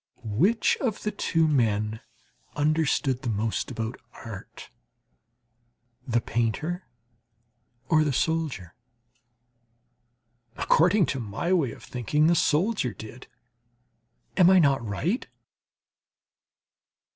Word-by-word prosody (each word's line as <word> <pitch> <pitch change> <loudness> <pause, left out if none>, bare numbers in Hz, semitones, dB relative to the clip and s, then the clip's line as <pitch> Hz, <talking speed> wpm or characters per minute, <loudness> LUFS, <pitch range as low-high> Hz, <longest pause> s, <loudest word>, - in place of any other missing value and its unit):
Which 170 - +2
of 225 -6 -2
the 210 - -1
two 165 -5 +1
men 110 -6 +1 0.6
understood 145 -3 +1
the 120 - -3
most 110 +1 -1
about 115 +1 -4 0.3
art, 105 -4 -10 1.4
the 120 -1 +2
painter 120 - -2 1.0
or 155 +1 +4
the 150 - 0
soldier? 140 - -1 1.8
According 180 +4 +3
to 135 - -3
my 115 - -2
way 150 -10 +2
of - - -12
thinking, 140 +5 0
the 170 - +5
soldier 165 - +1
did; 110 +3 -11 1.1
am 180 -2 +7
I 190 - +6
not 140 -7 +3
right? 135 - -2
140 Hz, 100 wpm, -26 LUFS, 115-170 Hz, 1.8 s, am